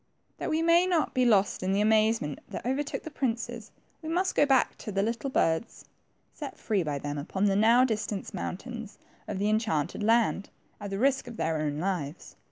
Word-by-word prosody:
That - - -3
we 320 +1 +1
may 340 +2 +5
not 345 -4 +1
be 255 -2 +2
lost 205 -4 +3
in 185 +1 0
the 200 - +2
amazement 215 -7 +2
that - - -6
overtook 275 +3 -2
the 315 - -7
princes, 240 -4 -3 0.3
we 315 - -6
must 365 +3 +1
go 290 - +4
back 270 -2 +3
to 215 - -6
the 195 0 +1
httle 235 +5 -2
birds 165 -1 0 0.5
set 290 -3 -7
free 210 -4 0
by 150 -4 -2
them 145 +1 -4
upon 190 +7 -1
the 195 -1 +3
now 230 +5 +5
distant 215 -4 -3
moun 180 -1 -3
tains 230 -1 -8 0.3
of 205 - -3
the 200 +2 0
enchanted 215 -7 0
land, 225 -2 +2 0.3
at 205 -1 -6
the 195 - -3
risk 265 +3 +1
of 235 -1 -8
their 160 -6 0
own 145 -1 -2
lives. 170 -3 -3
220 Hz, 200 wpm, -28 LUFS, 190-255 Hz, 0.5 s, may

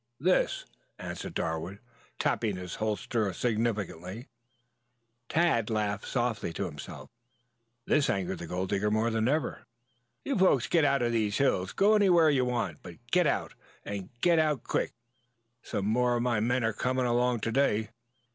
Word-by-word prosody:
"This," 180 +6 +1 0.3
answered - - -6
Darwood, 80 +4 -3 0.4
tapping 105 -3 0
his 90 -2 -6
holster 110 0 -1
significantly. 110 - -2 1.0
Tad 160 -10 +2
laughed 105 -2 -1
softly 120 -7 -1
to 100 - -2
himself. 75 -5 -9 0.7
This 150 -2 +2
angered 95 -2 -1
the 85 - -6
gold 90 +2 -3
digger 105 +1 +1
more 110 +2 +1
than 110 0 +1
ever. 145 0 0 0.6
"You 275 - 0
folks 140 -10 +4
get 170 -3 +2
out 140 -3 +2
of 120 - +1
these 110 -3 0
hills! 95 -9 +1
Go 205 +2 +4
anywhere 175 -7 +5
you 130 -3 +2
want 115 -11 -2
to, - - -30
but - - -24
get - - +4
out - - -1 0.3
and 100 -2 -5
get 170 -2 +4
out 150 -5 +1
quick. - - -1 0.7
Some 100 - -3
more 120 +3 +2
of 120 - 0
my 120 -3 +1
men 120 +3 +1
are 110 0 +1
coming 130 +3 0
along 120 -1 +1
to 115 - -1
day. 110 -5 +1
115 Hz, 160 wpm, -29 LUFS, 100-130 Hz, 1.0 s, anywhere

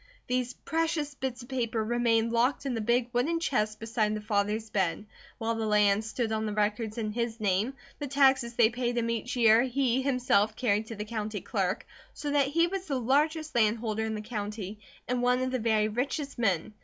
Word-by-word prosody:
These 250 0 -1
precious 320 -2 -1
bits 260 -2 -4
of 245 - -14
paper 235 -4 -1
remained 230 -1 +2
locked 245 +4 +1
in 270 - -1
the 225 - -2
big 240 +2 +1
wooden 300 +8 +1
chest 215 -9 0
beside 220 -1 0
the - - -3
father's 210 +1 -1
bed, 190 0 0 0.3
while 230 -1 -1
the 225 -1 -2
land 210 0 +3
stood 225 +1 -2
on 220 0 -1
the 210 - -3
records 215 +1 -1
in 215 -2 -2
his 235 0 -2
name; 210 +5 0 0.2
the 290 - -3
taxes 265 -3 +3
they 230 -1 +5
paid 240 0 -2
him 230 0 0
each 230 +2 -3
year 225 -2 +6
he, 260 0 +1
himself, 250 -6 +2
carried 220 -3 0
to 225 - -6
the 210 0 -5
county 215 -1 -3
clerk; 195 -3 -1 0.3
so 290 - -3
that 285 -2 +3
he 335 +4 +3
was 380 +2 -4
the 275 -4 -1
largest 305 +5 +1
landholder 220 -1 +1
in 220 0 -2
the 210 - -4
county 210 -2 -5 0.3
and 250 0 0
one 250 0 +3
of 255 0 -1
the 255 - 0
very 215 -2 +2
richest 275 +5 -3
men. 200 -3 0
230 Hz, 205 wpm, -29 LUFS, 215-255 Hz, 0.3 s, year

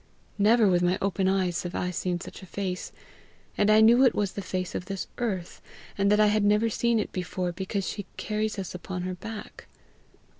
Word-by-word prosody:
Never 220 +2 +5
with 180 -2 +3
my 180 +1 +2
open 195 -1 0
eyes 185 -2 +1
have 175 -1 -6
I 180 - -1
seen 180 0 -2
such - - -10
a 190 - -11
face! 185 -1 -4 0.6
And 205 - +2
I 215 +1 +6
knew 235 +4 +7
it 255 - +4
was 205 -2 0
the 200 - -5
face 185 -1 -3
of 180 - -4
this 195 0 -4
earth, 195 -8 -3 0.3
and 200 0 +2
that 210 - +4
I 215 - +6
had 210 0 +2
never 210 +2 +3
seen 235 +1 +1
it 215 - -2
before 180 0 -3
because 190 +2 -3
she 205 -2 -5
carries 215 0 -2
us 190 -2 -5
upon 180 0 -5
her 185 0 -3
back. 215 +4 -9
195 Hz, 210 wpm, -27 LUFS, 180-215 Hz, 0.6 s, knew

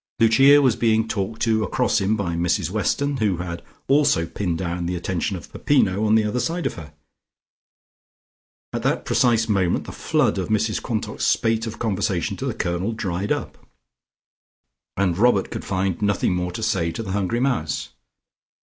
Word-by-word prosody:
Lucia 135 +6 +6
was 125 -5 +3
being 110 -1 +2
talked 110 +1 -3
to 110 -2 +2
across 120 -1 +1
him 100 +3 +1
by 90 -5 -2
Mrs 85 +1 0
Weston, 140 +7 0
who 105 -6 +1
had 85 -1 -5 0.3
also 135 - +3
pinned 85 -1 -3
down 85 0 -3
the 90 - -2
attention 95 +2 -2
of - - -12
Peppino 110 -8 +2
on 110 - +4
the 110 - +4
other 105 +4 -1
side 165 +8 -2
of - - 0
her. 75 -2 -11 1.8
At - - -2
that - - 0
precise 115 -3 +2
moment 95 -5 +1
the - - -8
flood - - 0
of - - -2
Mrs 110 0 0
Quantock's 110 -3 -2
spate 115 0 +1
of 110 - -6
conversation 100 -5 -1
to 135 - -4
the 120 - -2
Colonel 90 +2 -2
dried 100 -2 -3
up, - - -3 1.4
and 95 -3 +1
Robert 110 -4 +3
could - - -5
find 95 -1 -2
nothing 105 -3 +1
more 90 0 -2
to 110 +5 -5
say 95 -7 0
to 115 - -4
the 95 - -5
hungry 100 +4 -1
mouse. 125 - -1
105 Hz, 175 wpm, -22 LUFS, 90-115 Hz, 1.8 s, Lucia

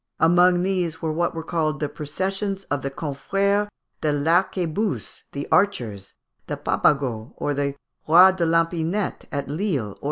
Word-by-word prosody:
Amongst 175 +2 +5
these 180 -4 -1
were 160 - 0
what 170 +1 0
were 165 - -4
called 155 -2 -1
the 150 - -1
processions 195 +7 -3
of 145 -2 0
the 135 - -2
Confrères 195 +9 0 0.3
de 155 - +1
l'Arquebuse, 175 +5 0
the 140 0 -5
Archers, 115 - +1 0.3
the - - -3
Papegaut, 125 -5 0 0.2
the 140 0 -1 0.3
roi 180 +4 +8
de 185 -2 -2
l'Epinette, 165 +4 0
at 140 -2 -3
Lille 145 - -2
(Fig. - - -23
165 Hz, 140 wpm, -23 LUFS, 145-185 Hz, 0.3 s, roi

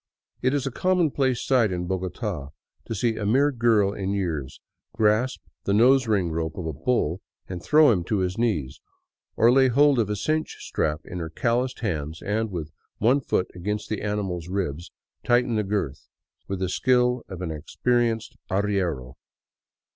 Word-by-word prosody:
It 130 +3 +2
is 140 -2 -1
a 135 - -2
commonplace 150 -7 +1
sight 120 -6 +3
in 90 -1 -2
Bogota 95 - -3 0.4
to 115 - -4
see 110 +2 0
a 105 - -3
mere 140 +7 +4
girl 115 -5 +3
in 95 0 -2
years 80 -9 -3 0.3
grasp 110 +3 +1 0.2
the 100 - +1
nosering 110 -6 +4
rope 80 -1 -3
of 90 - -4
a 80 - -3
bull 90 - 0 0.3
and 90 -2 -6
throw 150 - +5
him 90 -6 +1
to 105 - 0
his 90 -1 -1
knees, 105 - -1 0.5
or 115 +2 +5
lay 130 +1 +5
hold 140 +1 +4
of 110 -3 +1
a 105 - 0
cinch 155 +10 -1
strap 75 0 -1
in 90 - -6
her 80 -1 -4
calloused 120 +9 -1
hands 80 -7 -3
and, 110 +2 -1
with 80 -5 -5 0.3
one 125 +6 +3
foot 95 - -1
against 105 +4 -4
the 110 - -2
animal's 95 -5 -2
ribs, 90 -4 -3 0.3
tighten 120 0 +2
the 105 - +1
girth 95 -9 -3 0.4
with 95 - -3
the 95 - 0
skill 125 +3 +2
of 95 -2 -6
an 85 - -3
experienced 115 +8 -1
arriero. 95 -10 -1
105 Hz, 170 wpm, -25 LUFS, 90-125 Hz, 0.5 s, throw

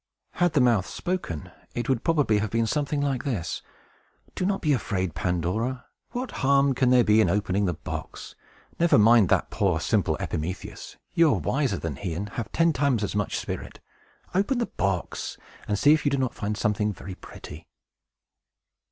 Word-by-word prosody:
Had 175 -3 +1
the 140 - +4
mouth 115 -7 +3
spoken, 175 - -4 0.2
it 120 - -2
would 130 -4 0
probably 145 -11 +2
have 105 0 -1
been 115 +2 +1
something 145 +3 -1
like 135 -3 -1
this: 105 -12 -3 0.7
"Do 185 - -1
not 200 -1 0
be 150 -4 +2
afraid, 95 - -1
Pandora! 90 +10 -1 0.2
What 250 +1 -4
harm 140 0 +4
can 130 0 +2
there 125 -1 +6
be 110 0 +5
in - - +3
opening 100 0 +1
the 90 -3 0
box? - - -7 0.5
Never 170 0 +5
mind 110 -2 +6
that - - +2
poor, - - +1
simple - - +1
Epimetheus! 85 +5 -5 0.2
You 165 -3 +4
are - - -2
wiser 135 -8 0
than 80 -6 -4
he, 90 -2 -4
and 100 +4 -4
have 110 0 -5
ten 165 -1 +3
times 130 -5 +1
as 100 - -2
much 105 0 -1
spirit. - - -6 0.5
Open 200 +8 +1
the 240 - +1
box, 95 - -3 0.3
and 105 - 0
see 145 +8 +6
if 155 - +1
you 145 - +3
do 140 - 0
not 130 -2 0
find 105 0 -3
something 105 -1 +1
very 95 0 -8
pretty!" 80 -3 -11
115 Hz, 180 wpm, -26 LUFS, 100-145 Hz, 0.7 s, there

